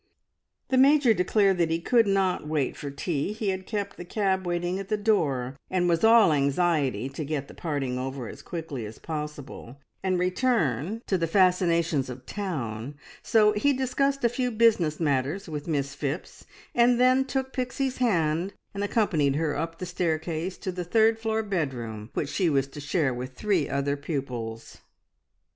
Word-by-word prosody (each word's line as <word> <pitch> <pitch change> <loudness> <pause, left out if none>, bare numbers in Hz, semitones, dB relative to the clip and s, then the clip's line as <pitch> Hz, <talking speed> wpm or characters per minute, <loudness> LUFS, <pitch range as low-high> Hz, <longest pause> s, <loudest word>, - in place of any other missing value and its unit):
The 260 - +3
Major 275 -3 +6
declared 195 0 +2
that 170 -2 +2
he 165 +1 0
could 230 +5 +3
not 190 -5 +1
wait 150 -3 -1
for 145 - -6
tea. 145 +5 -2
He 215 -2 -2
had 190 0 -3
kept 205 -2 -3
the - - -6
cab 190 0 -1
waiting 175 +2 -1
at 195 - -6
the 215 +1 0
door, 145 - +1
and 180 -1 +1
was 170 +2 +1
all 225 -7 +7
anxiety 140 -2 +1
to 155 - -5
get 140 -1 -3
the - - -12
parting 140 -6 -3
over 130 -1 -4
as - - -9
quickly 160 -8 -5
as 110 - -10
possible 150 -5 -7 0.2
and 185 -1 +1
return 180 - 0
to 190 - 0
the 165 - 0
fascinations 170 -6 +2
of 125 0 -8
town, 140 - -4 0.3
so 215 -2 +4
he 245 +7 +2
discussed 275 +1 0
a 235 - +4
few 250 +1 -1
business 215 -9 +3
matters 145 +5 0
with 150 -1 -5
Miss 140 -3 -1
Phipps, 145 +3 -5 0.3
and 240 0 +4
then 255 +1 +5
took 265 0 -3
Pixie's 260 +1 -2
hand 175 -6 +1 0.2
and 200 0 -3
accompanied 180 -10 +1
her 150 -1 0
up 165 0 -3
the 185 - -5
staircase 170 0 -2
to 185 - -4
the 180 0 -4
third 220 +4 +3
floor 220 0 -1
bedroom 125 - -3
which 140 - -1
she 180 0 +1
was 135 -3 +2
to 145 - -9
share 145 -1 0
with 125 +1 -6
three 190 -1 0
other 140 +1 0
pupils. 125 -6 -5
175 Hz, 175 wpm, -27 LUFS, 140-210 Hz, 0.3 s, all